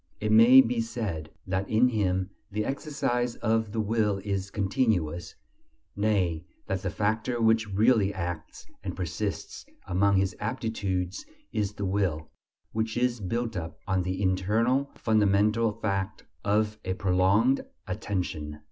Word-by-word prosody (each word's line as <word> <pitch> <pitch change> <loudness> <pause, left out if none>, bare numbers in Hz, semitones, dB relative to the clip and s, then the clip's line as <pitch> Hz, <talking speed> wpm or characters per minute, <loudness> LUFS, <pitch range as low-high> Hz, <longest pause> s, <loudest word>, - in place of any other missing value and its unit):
It 105 0 -1
may 115 +4 +9
be 120 -2 0
said 105 -9 -4 0.2
that 95 +1 -2
in 115 +4 +4
him 95 -4 0 0.2
the 105 +1 -2
exercise 125 -4 -1
of 110 -2 0
the 110 - -2
will 105 -1 +1
is 100 -1 -2
continuous; 95 - 0 0.6
nay, 95 -6 +1 0.2
that 95 -1 -2
the 95 - -2
factor 110 +5 -1
which 110 -1 +3
really 105 0 +3
acts 85 -4 -5 0.2
and - - -4
persists 90 +3 -4 0.2
among 100 +2 +2
his 95 +1 +1
aptitudes 105 -6 -2 0.3
is 105 -1 -1
the 100 - -3
will, 95 -5 -1 0.4
which 110 +1 -2
is 125 -1 +1
built 115 +3 -2
up 80 -3 -5
on 95 -1 +1
the 95 +1 -2
internal 110 +9 +1
fundamental 105 +1 +3
fact 100 -2 -3 0.2
of 105 +1 +1
a 95 0 -2
prolonged 95 +8 +3 0.2
attention. 90 -7 -3
105 Hz, 135 wpm, -28 LUFS, 95-115 Hz, 0.6 s, may